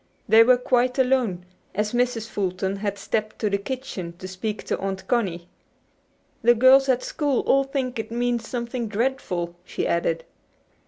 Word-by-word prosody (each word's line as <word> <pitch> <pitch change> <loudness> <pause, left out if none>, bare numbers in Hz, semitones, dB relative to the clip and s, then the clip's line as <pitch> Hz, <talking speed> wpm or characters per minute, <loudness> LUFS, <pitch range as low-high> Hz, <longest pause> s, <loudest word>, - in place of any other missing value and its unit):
They 220 +1 +7
were 250 +2 +5
quite 250 +1 +1
alone, 250 -9 +1 0.3
as 210 +2 -1
Mrs. 240 -2 0
Fulton 190 -1 -2
had 200 0 -3
stepped 215 +2 -2
to 210 -2 -1
the 200 - +1
kitchen 200 -7 -5
to 185 - -7
speak 205 +3 -4
to - - -2
Aunt 190 -1 -4
Connie. 185 -8 -1 0.9
"The 240 +1 +5
girls 265 +3 +6
at 255 -1 +2
school 290 -4 0
all 275 0 +3
think 265 -3 -3
it 225 - -4
means 240 -1 -1
something 235 -1 -3
dreadful," 210 -7 -2
she - - -3
added. 165 -1 0
225 Hz, 160 wpm, -24 LUFS, 195-250 Hz, 0.9 s, They